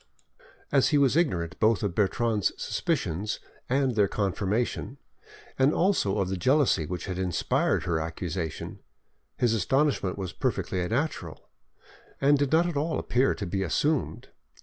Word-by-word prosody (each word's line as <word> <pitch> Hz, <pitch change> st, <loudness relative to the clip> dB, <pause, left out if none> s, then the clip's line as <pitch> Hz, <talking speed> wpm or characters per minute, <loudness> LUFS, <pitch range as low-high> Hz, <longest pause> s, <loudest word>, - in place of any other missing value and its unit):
As 135 Hz, -2 st, +4 dB
he 150 Hz, -, +3 dB
was 140 Hz, -2 st, +3 dB
ignorant 90 Hz, -, 0 dB
both 110 Hz, -3 st, +3 dB
of 100 Hz, -4 st, -1 dB
Bertrande's 105 Hz, +1 st, +1 dB
suspicions 95 Hz, +7 st, -2 dB, 0.3 s
and 130 Hz, 0 st, +2 dB
their 105 Hz, -2 st, +4 dB
confirmation, 105 Hz, +6 st, -2 dB, 0.6 s
and 135 Hz, +3 st, +4 dB
also 170 Hz, -, +2 dB
of 95 Hz, -2 st, 0 dB
the 95 Hz, 0 st, -2 dB
jealousy 125 Hz, -, +2 dB
which 90 Hz, +2 st, -4 dB
had 90 Hz, -1 st, -4 dB
inspired 90 Hz, -3 st, 0 dB
her 85 Hz, -2 st, 0 dB
accusation, 80 Hz, 0 st, -4 dB, 0.6 s
his 120 Hz, -2 st, +2 dB
astonishment 125 Hz, -, +1 dB
was 95 Hz, -3 st, -5 dB
perfectly 90 Hz, -1 st, -1 dB
natural, 140 Hz, -, -3 dB, 0.7 s
and 140 Hz, +1 st, +4 dB
did 145 Hz, -1 st, 0 dB
not 165 Hz, +2 st, +4 dB
at 175 Hz, -3 st, -2 dB
all 155 Hz, +3 st, 0 dB
appear 125 Hz, +3 st, +1 dB
to -, -, -5 dB
be 95 Hz, +3 st, -2 dB
assumed. 145 Hz, -, -1 dB
110 Hz, 145 wpm, -27 LUFS, 95-140 Hz, 0.7 s, As